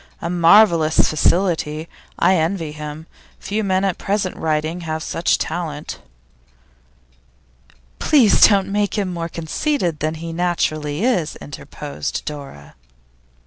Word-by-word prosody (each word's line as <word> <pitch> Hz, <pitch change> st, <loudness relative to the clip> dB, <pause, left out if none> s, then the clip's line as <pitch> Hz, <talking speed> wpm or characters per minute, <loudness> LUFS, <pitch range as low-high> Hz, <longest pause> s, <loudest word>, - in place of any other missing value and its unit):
A 170 Hz, -, -4 dB
marvellous 170 Hz, -2 st, +5 dB
facility! 160 Hz, -1 st, +1 dB, 0.3 s
I 190 Hz, -, +4 dB
envy 165 Hz, -2 st, -1 dB
him. 150 Hz, +1 st, -8 dB, 0.3 s
Few 210 Hz, +3 st, -2 dB
men 190 Hz, -1 st, +1 dB
at 190 Hz, -3 st, -1 dB
present 195 Hz, -2 st, -1 dB
writing 160 Hz, +2 st, -2 dB
have 160 Hz, -1 st, -4 dB
such 165 Hz, -, 0 dB
talent.' 155 Hz, -4 st, -4 dB, 2.0 s
'Please 260 Hz, -9 st, +4 dB
don't 195 Hz, -2 st, +1 dB
make 205 Hz, +1 st, 0 dB
him 190 Hz, -3 st, -1 dB
more 170 Hz, -1 st, -4 dB
conceited 170 Hz, -, -2 dB
than 155 Hz, +1 st, -1 dB
he 165 Hz, +1 st, -6 dB
naturally 160 Hz, -2 st, -1 dB
is,' 185 Hz, -11 st, 0 dB
interposed 75 Hz, 0 st, -6 dB
Dora. 140 Hz, -, -8 dB
165 Hz, 115 wpm, -20 LUFS, 155-190 Hz, 2.0 s, marvellous